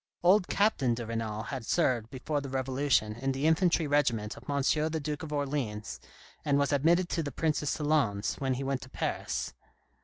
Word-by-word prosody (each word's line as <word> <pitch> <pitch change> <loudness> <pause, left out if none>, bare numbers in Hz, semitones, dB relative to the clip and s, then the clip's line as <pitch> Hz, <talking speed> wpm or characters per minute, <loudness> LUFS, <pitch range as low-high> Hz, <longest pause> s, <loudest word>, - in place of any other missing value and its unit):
Old 185 +1 +5
Captain 140 - +2
de 120 0 -5
Renal 110 -1 -3
had 130 +1 -5
served, 120 -5 +1
before 145 +2 -2
the 140 - -6
Revolution, 130 -4 +1
in 135 +4 -2
the 135 +3 -2
infantry 165 +1 +3
regiment 125 -7 +1
of - - -13
M. 140 -1 0 0.3
the 160 0 -2
Duke 150 0 -4
of 160 - -7
Orleans, 130 - -2 0.4
and 140 -1 +2
was 140 0 +2
admitted 170 +6 +3
to 165 - 0
the 145 -2 -4
Prince's 150 -2 0
salons 145 -10 +1
when 130 -2 0
he 135 - -3
went 135 -1 -1
to 130 - -10
Paris. - - -3
140 Hz, 185 wpm, -30 LUFS, 120-150 Hz, 0.4 s, Old